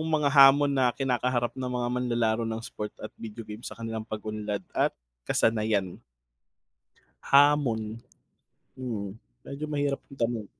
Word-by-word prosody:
mga 150 -2 +2
hamon 140 0 +7
na 130 -3 +2
kinakaharap 125 -2 0
ng 130 0 -4
mga 125 -1 -1
manlalaro 120 -2 +1
ng 110 0 -3
sport 105 0 -6
at 110 - -8
video 115 0 -7
game 105 +1 -8
sa - - -7
kanilang 115 -1 -5
pag-unlad 105 -1 -4
at - - +1 0.3
kasanayan? 105 -5 +1 1.3
Hamon, 140 -5 +5 0.9
hmm, 115 -6 -4 0.4
medyo 140 +2 -6
mahirap 145 -2 0
na - - -12
tanong. 115 -2 -1
120 Hz, 130 wpm, -27 LUFS, 110-135 Hz, 1.3 s, hamon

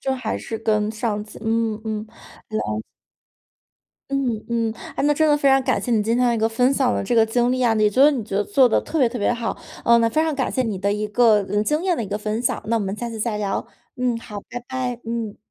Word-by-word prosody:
就 265 -1 -1
还 250 -4 -3
是 225 - -5
跟 215 -1 +1
上 215 -1 -2
级 215 - -12
嗯 225 -1 0
嗯。 215 -1 -3
了 225 - -19 1.8
嗯 255 -6 -1
嗯， 230 -1 0 0.3
诶， - - 0
那 295 0 +3
真 315 +2 +3
的 300 - +5
非 280 -1 +2
常 270 0 +5
感 - - +1
谢 - - -4
你 220 -3 +3
今 225 +3 +1
天 245 -1 +3
一 - - -1
个 220 - +2
分 250 +4 +2
享 260 -3 +2
的 - - -1
这 220 +5 -1
个 225 -1 +6
经 240 +2 +1
历 255 0 0
啊， 230 - +4
你 215 -1 +3
觉 230 +6 +3
得 295 - +8
你 260 -6 -2
觉 195 -2 -4
得 205 - +1
做 255 +5 +4
得 - - +3
特 325 - -3
别 255 - +4
特 240 - -5
别 205 - +2
好。 235 -1 -3 0.4
那 230 - +3
非 310 +6 +2
常 320 -2 0
感 265 -2 -1
谢 255 - +1
你 220 -5 -2
的 200 +2 0
一 210 +1 -2
个， 220 0 +4
呃， 205 +1 +1
经 300 +7 0
验 365 -3 +2
的 230 - -2
一 - - -7
个 205 +2 -3
分 215 +1 -2
享， 245 - 0
那 230 +2 +1
我 - - 0
们 195 -1 -2
下 235 +2 -5
次 225 -1 -7
再 215 -1 -1
聊。 200 -2 -2 0.3
嗯， 250 -2 0
好。 210 -2 -8
拜 245 - -5
拜。 255 -2 -3
嗯。 230 -2 -3
230 Hz, 285 characters per minute, -22 LUFS, 215-250 Hz, 1.8 s, 得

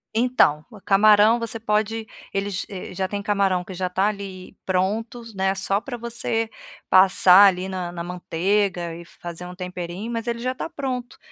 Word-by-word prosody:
Então, 225 -11 +3
o 215 -4 -13
camarão 210 +3 +5
você 230 -1 -4
pode 220 +1 -1 0.3
Eles, 195 0 -2
eh, 185 -2 -7
já 190 +1 -2
tem 200 +1 -4
camarão 195 -3 +1
que 190 - -9
já 180 0 -2
tá 190 +2 +1
ali 195 -3 -6
pronto, 210 +6 -1
né, 190 0 0
só 195 +1 0
para 245 0 -6
você 225 -1 -1 0.4
passar, 190 +1 +7
ali, 185 -1 0
na 185 -2 -4
na 170 -1 -6
manteiga 180 0 -1
e 170 - -9
fazer 175 +1 -9
um 180 - -9
temperinho, 180 +4 -6
mas 230 0 -3
ele 235 0 -1
já 255 +2 -2
tá - - -5
pronto. 255 -6 -5
195 Hz, 175 wpm, -23 LUFS, 185-225 Hz, 0.4 s, passar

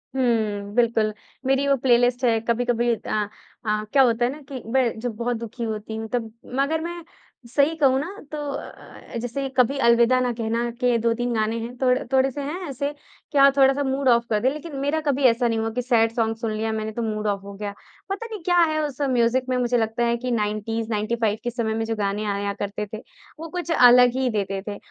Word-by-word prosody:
हुँ, 215 -5 0
बिल्कुल। 225 -3 +2 0.3
मेरी 270 +1 +2
वो 280 - +4
प्लेलिस्ट 245 0 +3
है, 225 -2 +3
कभी-कभी 240 0 +1
अ 210 -1 -2 0.4
अ, 215 0 0
क्या 275 - +6
होता 240 -1 +2
है 245 - 0
ना 300 +2 -9
कि 265 -3 -6
मैं 245 -4 +2
जब 240 -1 -4
बहुत 240 +2 -1
दुखी 235 +1 -6
होती 220 -1 -4
हूँ 220 0 -4
तब 230 -3 -1 0.3
मगर 310 +4 +1
मैं 345 +1 -5 0.5
सही 290 +3 +3
कहूँ 270 -4 +3
ना 290 - -3 0.2
तो 305 - -4 0.2
अ - - -4 0.5
अ, - - -1
जैसे 245 +4 -3
कभी 255 +2 +3
अलविदा 235 +2 +5
ना 250 -1 +1
कहना 230 +1 -1
के 245 -2 +3
2-3 235 +1 0
गाने 220 +1 0
हैं, 235 +2 -6
थोड़ 255 -1 +4 0.2
थोड़े-से 265 +1 +2
हैं 300 +6 -4
ऐसे 280 +2 -2 0.4
कि 290 - -1
हाँ, 275 0 +7
थोड़ा-सा 275 +1 +4
मूड 265 0 -1
ऑफ 235 -1 +4
कर 215 - +2
दे, 255 - +2
लेकिन 305 0 -8
मेरा 285 +3 0
कभी 280 0 +1
ऐसा 235 0 +2
नहीं 225 -1 0
हुआ 225 0 -1
कि 250 +3 -2
सैड 230 -2 +3
सॉन्ग 225 -1 +1
सुन 225 -1 -3
लिया 220 +1 -2
मैंने 220 0 -3
तो 235 - -4
मूड 215 -1 -2
ऑफ 200 -1 -1
हो 200 0 -9
गया। 205 0 -5 0.4
पता 395 +4 -3
नहीं 440 -4 -7
क्या 355 +1 +2
है 315 -2 +3
उस 285 -2 -7
म्यूज़िक़ 255 -2 +2
में 255 - +1
मुझे 245 0 +1
लगता 225 +1 0
है 235 0 +1
कि 250 +1 -3
90s 220 0 -2
95 215 0 0
के 240 - -1
समय 225 -2 -1
में 225 0 -1
जो 225 0 -2
गाने 205 0 -1
आया 200 0 -1
करते 205 +1 -4
थे 220 - -5 0.4
वो 330 +1 -7
कुछ 345 0 -4
अलग 250 -4 +7
ही 260 -1 +1
देते 195 -3 -2
थे 205 -1 -4
235 Hz, 225 wpm, -23 LUFS, 220-265 Hz, 0.5 s, हाँ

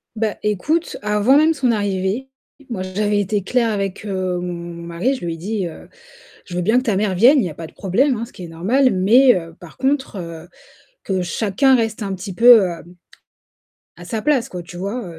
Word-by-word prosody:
Ben, 215 -1 -1
écoute, 290 - -1
avant 210 +6 +3
même 315 +2 +4
son 260 -5 +1
arrivée, 205 +4 -2 0.4
moi, 200 -6 -4
j'avais 205 +2 -1
été 205 +1 -1
claire 230 +3 0
avec, 200 0 -3
heu, 185 -2 -2
mon 180 0 -4 0.3
mari, 170 +11 -1
je 215 - -7
lui 165 -1 -3
ai - - -11
dit, 195 +2 -3
heu: 160 - -11 0.6
«Je 175 - -8
veux 180 - 0
bien 220 +7 +2
que 255 - +2
ta 215 -6 0
mère 200 -1 0
vienne, 245 +10 +6
il 220 - +1
y - - -3
a - - -8
pas 165 +1 -8
de - - -19
problème, 245 +8 +1
hein, 230 - -4
ce 235 - -17
qui 180 - -10
est - - -7
normal, 225 +12 +1
mais 240 +7 +5
heu, 165 -2 -5
par 175 -2 -14
contre, 265 -3 -1
heu, 165 -1 -8 0.6
que 190 -2 -1
chacun 220 +8 +2
reste 225 -2 0
un 195 -1 -3
petit 190 +1 -7
peu, 235 -1 +8
heu, 175 -2 -2 1.2
à - - -12
sa 220 -3 -3
place, 275 -4 +1
quoi», 180 -1 -6
tu 175 +1 -11
vois? 200 +7 -4
205 Hz, 215 wpm, -20 LUFS, 185-245 Hz, 1.2 s, peu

